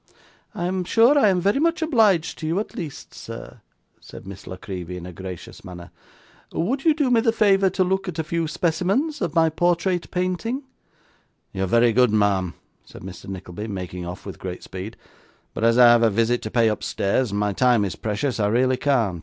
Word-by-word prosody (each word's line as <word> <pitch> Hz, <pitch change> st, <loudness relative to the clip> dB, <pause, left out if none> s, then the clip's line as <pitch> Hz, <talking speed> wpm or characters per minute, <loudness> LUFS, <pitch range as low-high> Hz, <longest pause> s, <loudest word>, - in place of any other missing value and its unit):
'I 175 Hz, -, -2 dB
am 185 Hz, +1 st, -1 dB
sure 230 Hz, +9 st, +4 dB
I 250 Hz, -8 st, +5 dB
am 185 Hz, -2 st, +2 dB
very 200 Hz, +8 st, +1 dB
much 335 Hz, +1 st, +1 dB
obliged 215 Hz, -, +2 dB
to 155 Hz, -, -4 dB
you 165 Hz, +5 st, 0 dB
at 215 Hz, -, -5 dB
least, 155 Hz, -5 st, -7 dB
sir,' 65 Hz, +1 st, -10 dB, 0.4 s
said -, -, -12 dB
Miss 95 Hz, 0 st, -10 dB
La 95 Hz, -, -6 dB
Creevy 90 Hz, -1 st, -7 dB
in 90 Hz, -, -8 dB
a 90 Hz, -, -8 dB
gracious 90 Hz, -1 st, -9 dB
manner. 90 Hz, -1 st, -10 dB, 0.6 s
'Would 260 Hz, -, -2 dB
you 315 Hz, -2 st, +5 dB
do 290 Hz, -5 st, +1 dB
me 230 Hz, -2 st, +4 dB
the 225 Hz, -1 st, +3 dB
favour 195 Hz, -3 st, +3 dB
to 185 Hz, +1 st, +1 dB
look 190 Hz, +1 st, -1 dB
at 175 Hz, -2 st, -5 dB
a 160 Hz, -, -1 dB
few 165 Hz, +1 st, -2 dB
specimens 190 Hz, -, 0 dB
of 170 Hz, -5 st, -2 dB
my 165 Hz, -1 st, +5 dB
portrait 175 Hz, +2 st, 0 dB
painting?' 185 Hz, +9 st, -2 dB, 0.9 s
'You're 95 Hz, 0 st, -1 dB
very 115 Hz, +3 st, +4 dB
good, 125 Hz, +1 st, +4 dB
ma'am,' 100 Hz, -4 st, +1 dB, 0.3 s
said -, -, -13 dB
Mr. 90 Hz, -2 st, -9 dB
Nickleby, 95 Hz, +2 st, -7 dB
making 90 Hz, -3 st, -5 dB
off 90 Hz, +2 st, -8 dB
with 95 Hz, -5 st, -8 dB
great 90 Hz, -1 st, -6 dB
speed; 95 Hz, +5 st, -8 dB, 0.6 s
'but -, -, -4 dB
as 115 Hz, +1 st, +4 dB
I 125 Hz, -1 st, +8 dB
have 120 Hz, -1 st, +5 dB
a 115 Hz, -, +4 dB
visit 115 Hz, +3 st, +1 dB
to 110 Hz, -, -5 dB
pay 115 Hz, 0 st, +3 dB
upstairs, 110 Hz, +2 st, 0 dB
and 100 Hz, +1 st, -2 dB
my 105 Hz, -1 st, 0 dB
time 120 Hz, -1 st, +3 dB
is 95 Hz, -, -4 dB
precious, 110 Hz, +4 st, -2 dB
I 105 Hz, -, +2 dB
really 130 Hz, +4 st, +2 dB
can't. 115 Hz, -12 st, +1 dB
125 Hz, 205 wpm, -23 LUFS, -, 0.9 s, I